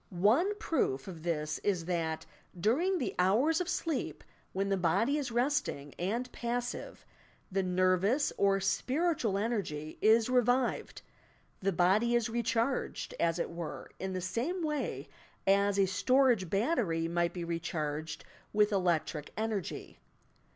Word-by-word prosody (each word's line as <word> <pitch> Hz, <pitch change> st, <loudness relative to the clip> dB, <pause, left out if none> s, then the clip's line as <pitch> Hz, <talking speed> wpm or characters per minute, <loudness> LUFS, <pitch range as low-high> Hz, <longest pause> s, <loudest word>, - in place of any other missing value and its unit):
One 230 Hz, -, +3 dB
proof 225 Hz, -, -1 dB
of 170 Hz, -4 st, -8 dB
this 155 Hz, -2 st, -2 dB
is 185 Hz, -5 st, 0 dB
that, 165 Hz, -3 st, -2 dB, 0.3 s
during 320 Hz, -, +2 dB
the 260 Hz, -, -2 dB
hours 245 Hz, -, +3 dB
of 360 Hz, -, -3 dB
sleep, 260 Hz, -, -2 dB, 0.3 s
when 195 Hz, +1 st, -1 dB
the 195 Hz, -, +2 dB
body 195 Hz, -, +2 dB
is 275 Hz, -4 st, -3 dB
resting 240 Hz, -, 0 dB
and 235 Hz, +8 st, -2 dB
passive, 245 Hz, +1 st, -4 dB, 0.5 s
the 195 Hz, +1 st, +1 dB
nervous 185 Hz, +8 st, +2 dB
or 195 Hz, -1 st, +3 dB
spiritual 260 Hz, -, 0 dB
energy 195 Hz, -9 st, -3 dB
is 220 Hz, +1 st, +5 dB
revived, 250 Hz, 0 st, +1 dB, 0.6 s
the 195 Hz, +1 st, +1 dB
body 195 Hz, +7 st, +3 dB
is 235 Hz, -1 st, +1 dB
recharged, 235 Hz, +2 st, -1 dB
as 165 Hz, 0 st, +2 dB
it 170 Hz, -, -2 dB
were, 170 Hz, -2 st, -6 dB
in 190 Hz, 0 st, -3 dB
the 185 Hz, -, -2 dB
same 255 Hz, -, -2 dB
way 270 Hz, -, -2 dB, 0.4 s
as 200 Hz, +1 st, +3 dB
a 200 Hz, -, +5 dB
storago 240 Hz, 0 st, +3 dB
battery 195 Hz, -, +1 dB
might 170 Hz, 0 st, +1 dB
be 175 Hz, -1 st, -5 dB
recharged 160 Hz, -2 st, -3 dB, 0.3 s
with 210 Hz, 0 st, +3 dB
elec 180 Hz, -5 st, +2 dB
tric 150 Hz, -2 st, -6 dB
energy. 215 Hz, -4 st, -3 dB
200 Hz, 135 wpm, -32 LUFS, 175-245 Hz, 0.6 s, is